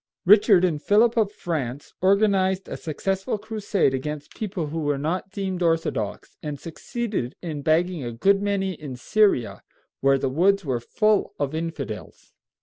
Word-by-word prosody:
Richard 200 -1 +6
and 155 -5 -1
Philip 220 +5 +4
of 215 -3 +2
France 145 - -4
organized 190 -1 +2
a - - -5
successful 190 +6 -2
crusade 210 -7 0
against 150 +2 -4
people 195 -6 -3
who 165 +2 -3
were 145 -2 0
not 170 +7 -2
deemed 190 -2 -4
orthodox, 165 -1 -1
and 150 -2 -5
succeeded 185 - -4
in 155 -4 -4
bagging 165 +1 +1
a 120 - -4
good 195 +12 +2
many 200 -2 0
in 150 -5 -8
Syria, 195 - +1 0.4
where 135 0 +4
the 135 - -1
woods 185 +7 +2
were 130 -4 0
full 205 - +1
of 145 0 -2
infidels. 155 -9 -6
175 Hz, 150 wpm, -24 LUFS, 145-200 Hz, 0.4 s, Richard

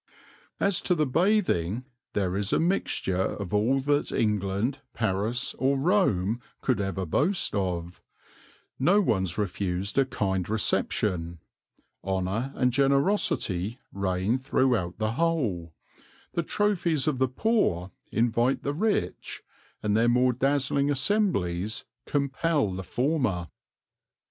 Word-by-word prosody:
"As 200 -2 +2
to 180 - +1
the 155 -2 +2
Bathing 130 - +1 0.3
there 95 -3 0
is 100 +1 -1
a - - +3
Mixture 160 - 0 0.2
of 100 -3 -6
all 115 +6 +3
that 145 +1 +1
England, 105 +3 0 0.2
Paris 110 +4 0
or 135 +1 +2
Rome 125 - +2 0.2
could 125 -6 0
ever 95 -1 -2
boast 160 - +1
of; 90 -3 -2 0.8
no 175 +10 +4
one's 95 - 0
refused 100 +1 -1
a 135 - +4
kind 95 -6 -1
Reception, 90 -5 0 0.7
Honour 95 +7 -1
and 125 -1 +1
Generosity 135 - +1 0.2
reign 95 +5 0
throughout 125 -9 +1
the 110 0 0
whole, 115 - -1 0.6
the 170 - +1
Trophies 170 -5 0
of 140 -4 0
the 130 - +3
Poor 125 - 0 0.2
invite 120 +3 +1
the 145 - -1
Rich, 210 +7 -2 0.4
and 105 0 +1
their 115 +2 +4
more 125 +1 +3
dazzling 140 +2 +1
Assemblies 130 - 0 0.2
compel 140 - 0
the 95 - -4
Former." 120 - -1
120 Hz, 120 wpm, -27 LUFS, 95-145 Hz, 0.8 s, no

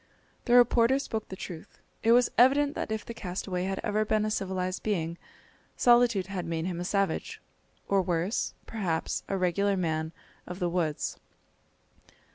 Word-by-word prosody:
The 245 - +4
reporter 245 +1 +5
spoke 225 -6 -4
the 190 - -6
truth. 175 -3 -9 0.2
It 225 - +3
was 245 +1 +5
evident 280 +4 +5
that - - -4
if 220 -1 -3
the 235 - -6
castaway 180 -2 -4
had 195 0 -2
ever 215 +1 +1
been 215 0 +1
a 215 - -1
civilised 185 -2 -2
being, 170 -5 -2 0.6
solitude 240 -5 +4
had 190 -1 -5
made 165 0 -2
him 180 -2 -3
a - - -2
savage, 195 +1 -1 0.5
or 195 -1 +3
worse, 180 +3 -1
perhaps 180 -8 -2
a 195 - -1
regular 195 +2 +1
man 160 -3 -1 0.4
of 180 - -6
the 180 -2 -1
woods. 170 -4 -2
195 Hz, 160 wpm, -28 LUFS, 180-220 Hz, 0.6 s, reporter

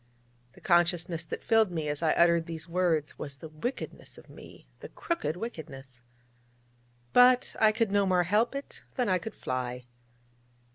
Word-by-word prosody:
The - - -18
consciousness 175 -1 +1
that - - -6
filled 225 -3 +4
me 160 -3 -3
as 145 +1 -2
I 160 -2 +3
uttered 170 -1 +3
these 165 0 -6
words 170 -4 0
was 140 -2 -5
the 160 - -10
wickedness 165 - -6
of - - -15
me - - -14
the - - -9
crooked 335 - -3
wickedness. 135 - -8 1.1
But 250 0 +5
I 220 -1 +6
could 220 -1 0
no 200 -1 +3
more 180 -1 +3
help 210 +9 +1
it 275 - -7
than 250 -3 0
I 185 -1 +2
could 220 +2 -8
fly. 125 -1 -4
175 Hz, 160 wpm, -29 LUFS, 155-215 Hz, 1.1 s, I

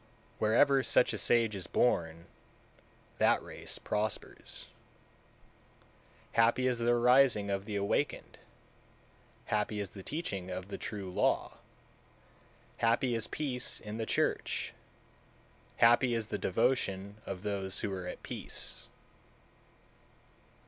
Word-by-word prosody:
Wherever 135 +6 +4
such 125 - +3
a - - -2
sage 115 -3 +2
is 90 -3 -5
born, 85 -8 +1 0.9
that - - +4
race - - -5
prospers. 105 0 -4 1.7
194. 115 - +5
Happy 120 +3 +2
is 125 -2 0
the 120 0 +1
arising 120 -3 +4
of 100 0 -2
the 105 - -4
awakened, 100 0 -1 1.1
happy 105 0 -1
is 100 -3 -4
the 100 - -9
teaching 100 - -4
of 90 +1 -5
the - - -6
True 100 -4 -5
Law, - - 0 1.2
happy 120 +2 +2
is 115 -2 -1
peace 130 -4 -2
in 105 0 -7
the 115 - -3
church, - - 0 1.0
happy 120 +1 +5
is 110 -2 -3
the 105 - -2
devotion 100 -1 0
of 95 -1 -5
those 95 -2 -2
who 100 -3 -2
are 90 -1 -5
at - - -7
peace. - - -6
105 Hz, 120 wpm, -32 LUFS, 100-120 Hz, 1.7 s, 194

